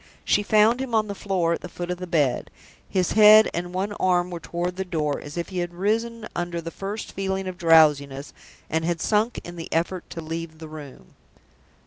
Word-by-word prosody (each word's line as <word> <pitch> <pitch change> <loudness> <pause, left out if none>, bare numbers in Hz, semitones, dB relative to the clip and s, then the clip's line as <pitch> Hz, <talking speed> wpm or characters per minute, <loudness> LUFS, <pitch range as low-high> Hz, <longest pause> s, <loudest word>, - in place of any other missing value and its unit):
She - - +3
found 215 +4 +3
him 250 -4 -2
on 215 -1 +3
the 200 - -4
floor 185 -4 0
at - - -4
the 180 - -8
foot 175 0 -5
of 180 - -4
the 180 - -6
bed: 150 -7 +1 0.4
his 185 -2 0
head 215 0 +7
and 175 +1 -3
one 190 +3 -2
arm 180 -2 +1
were 175 - -5
toward 175 +2 -3
the 190 - -2
door, 155 -5 -2
as 145 +3 -9
if 170 - -3
he 185 -2 -3
had 175 0 -4
risen 225 +4 -1
under 175 0 -2
the 165 0 -6
first 200 +4 -6
feeling 190 0 -2
of 185 - -4
drowsiness, 150 -4 +4 0.3
and 160 +1 -1
had 170 0 -1
sunk 215 +5 +1
in 175 0 -9
the 165 - -7
effort 170 +2 -1
to 170 - -7
leave 165 0 -6
the 160 0 -9
room. 145 - -11
175 Hz, 210 wpm, -24 LUFS, 165-200 Hz, 0.4 s, head